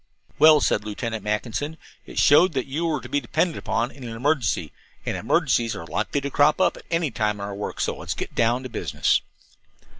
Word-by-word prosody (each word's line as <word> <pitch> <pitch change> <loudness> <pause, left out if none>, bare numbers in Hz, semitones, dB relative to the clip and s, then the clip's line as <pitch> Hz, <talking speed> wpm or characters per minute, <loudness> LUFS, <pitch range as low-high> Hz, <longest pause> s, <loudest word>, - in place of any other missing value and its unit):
"Well," 155 0 +7
said 105 - +1
Lieutenant 110 0 -4
Mackinson, 115 +9 -2 0.3
"it - - -10
showed 165 +4 +6
that 130 -2 -1
you 155 +5 -2
were 155 -2 -1
to - - -9
be 145 - 0
depended 160 +7 0
upon 115 +2 -1
in 135 - -13
an 115 -2 -6
emergency, 115 - 0 0.3
and - - -2
emergencies 115 -1 +1
are 80 - -7
likely 140 - -2
to 140 0 -4
crop 145 +4 +4
up 185 - +3
at - - -13
any 165 -4 0
time 105 -3 0
in 100 - -9
our 100 0 -4
work, 100 +1 -5
so - - -1
let's - - -4
get - - -5
down 120 +3 +1
to 130 - -6
business." - - 0
125 Hz, 210 wpm, -24 LUFS, 110-150 Hz, 0.3 s, Well